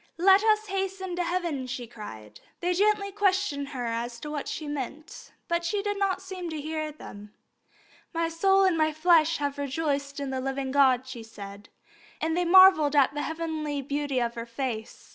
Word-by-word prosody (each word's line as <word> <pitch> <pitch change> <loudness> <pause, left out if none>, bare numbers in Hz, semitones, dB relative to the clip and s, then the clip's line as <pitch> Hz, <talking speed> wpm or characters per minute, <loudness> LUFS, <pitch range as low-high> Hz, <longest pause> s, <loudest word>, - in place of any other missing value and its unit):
"Let 385 +3 +6
us 430 -1 +3
hasten 385 -2 -3
to 355 - +1
heaven!" 340 -7 -2
she 250 -1 -5
cried. 205 - -11 0.2
They 355 +1 0
gently 405 +1 +2
questioned 380 -8 0
her 250 -4 -4
as 235 +1 -3
to 300 - -6
what 295 -2 -4
she 305 - -5
meant, 290 +2 -6 0.2
but 340 0 0
she 400 +4 -1
did 410 -1 -2
not 385 -1 0
seem 370 -2 -6
to 315 -1 -4
hear 310 +1 -3
them. 210 -8 -12 0.8
"My 335 -1 0
soul 385 +4 +3
and 375 -3 +3
my 310 -1 +1
flesh 330 0 +4
have 285 -1 -3
rejoiced 280 0 -2
in 280 -1 -3
the 260 -1 -2
living 270 0 -3
God," 260 -2 +4
she 260 -3 -8
said, 205 -2 -11 0.5
and 320 0 -1
they 355 0 +1
marvelled 345 -5 +7
at 280 -1 +4
the 295 - -3
heavenly 315 -3 -3
beauty 285 -1 -1
of 235 -1 -1
her 235 0 -6
face. 235 -2 -5
305 Hz, 185 wpm, -27 LUFS, 265-360 Hz, 0.8 s, marvelled